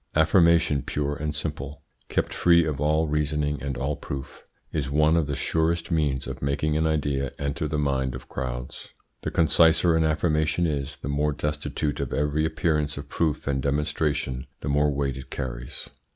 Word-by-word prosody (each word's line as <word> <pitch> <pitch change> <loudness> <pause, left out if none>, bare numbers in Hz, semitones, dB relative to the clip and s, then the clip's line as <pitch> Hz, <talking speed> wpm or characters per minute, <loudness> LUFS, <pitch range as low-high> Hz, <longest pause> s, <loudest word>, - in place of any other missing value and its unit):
Affirmation 80 -2 +4
pure 75 +1 -2
and 75 0 -3
simple, 75 -1 -5 0.3
kept - - 0
free 85 -1 +5
of 75 -3 -2
all 75 +2 +2
reasoning 75 -1 0
and 70 -2 -3
all 70 +3 -1
proof, 70 -1 -7 0.3
is 70 -3 -1
one 75 +3 +4
of 80 -4 +2
the 70 - -2
surest 80 +4 0
means 75 -5 +1
of - - -6
making 75 +2 0
an 80 +1 +2
idea 70 -3 0
enter 70 +3 -2
the 75 - -2
mind 65 -3 0
of 65 - -9
crowds. 60 -1 -5 0.3
The - - -2
conciser 80 +1 +4
an 80 - +3
affirmation 80 +1 +1
is, 70 -2 -2
the - - -7
more 75 +1 +1
destitute 75 0 -2
of 70 -3 -3
every 75 +1 +1
appearance 80 -2 0
of 70 0 -7
proof 80 -3 0
and 70 -1 0
demonstration, 70 -2 -1
the - - -3
more 75 +1 +3
weight 70 -2 -1
it 65 - -9
carries. - - -5
75 Hz, 175 wpm, -26 LUFS, 70-80 Hz, 0.3 s, free